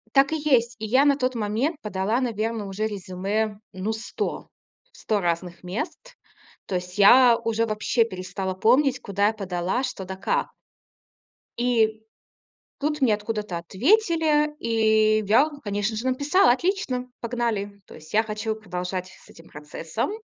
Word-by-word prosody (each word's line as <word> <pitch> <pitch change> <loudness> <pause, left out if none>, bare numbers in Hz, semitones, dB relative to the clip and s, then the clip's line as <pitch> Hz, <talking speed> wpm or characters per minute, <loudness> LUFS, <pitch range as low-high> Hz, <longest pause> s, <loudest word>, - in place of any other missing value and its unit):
Так 275 +1 +5
и 315 - +1
есть. 245 -6 +2
И 220 - -4
я 260 +6 +4
на 285 -1 +4
тот 255 -2 -1
момент 230 +8 -1
подала, 210 +3 -1
наверно, 225 -3 -2
уже 210 +3 -2
резюме, 205 +2 -3
ну, 195 +3 -3
100. 220 +1 -4 0.4
В - - -19
100 215 - -1
разных 175 0 -3
мест, 305 - -5 0.5
то 185 - -2
есть 180 +2 -6
я 240 +4 +7
уже 230 0 -1
вообще 220 +2 +1
перестала 185 -2 -5
помнить 255 +6 +3
куда 200 +1 0
я 215 - +2
подала, 190 +2 -2
что 195 -7 -4
да 190 - -6
как. 485 - -2 1.0
И 225 -3 +1 0.8
тут 300 +1 -1
мне 245 -6 +4
откуда-то 210 -3 -4
ответили 300 - +2
и 220 -2 +3
я, 255 +9 +4
конечно 205 +1 -1
же, 230 +4 -3
написала: 285 +3 +4
отлично, 265 -5 -1
погнали. 220 -4 -3
То - - -14
есть 155 +3 -13
я 220 - +5
хочу 220 0 -3
продолжать 185 -3 -5
с 190 - -18
этим 165 - -16
процессом. 160 - -4
220 Hz, 150 wpm, -24 LUFS, 195-255 Hz, 1.0 s, я